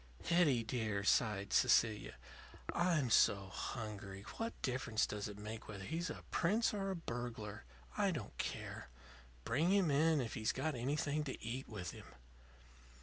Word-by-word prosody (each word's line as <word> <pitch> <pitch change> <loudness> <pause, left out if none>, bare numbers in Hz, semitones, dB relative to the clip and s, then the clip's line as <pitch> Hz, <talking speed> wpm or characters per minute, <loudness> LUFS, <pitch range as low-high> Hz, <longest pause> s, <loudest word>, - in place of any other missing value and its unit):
"Hetty, 155 -9 +4
dear," 110 -4 -1
sighed 105 -2 +2
Cecilia, 110 -3 +4 0.6
"I'm 165 -8 +2
so 100 -3 +5
hungry. 100 -2 -5
What 230 +1 -3
difference 125 -4 +1
does 105 -1 -4
it 105 -1 -8
make 110 +2 -7
whether 100 -2 -7
he's 165 - -2
a - - -6
prince 215 +8 +2
or 195 -1 -1
a 190 - -1
burglar? 115 - -5 0.3
I - - +3
don't - - -4
care. 65 - -4 0.5
Bring 150 +9 +2
him 195 -6 +4
in 155 +2 +4
if 120 -4 -2
he's 110 -1 0
got 155 -1 -1
anything 145 +4 0
to 135 - -4
eat 125 +4 -4
with 95 -7 -5
him." - - -11
120 Hz, 150 wpm, -37 LUFS, 105-155 Hz, 0.6 s, so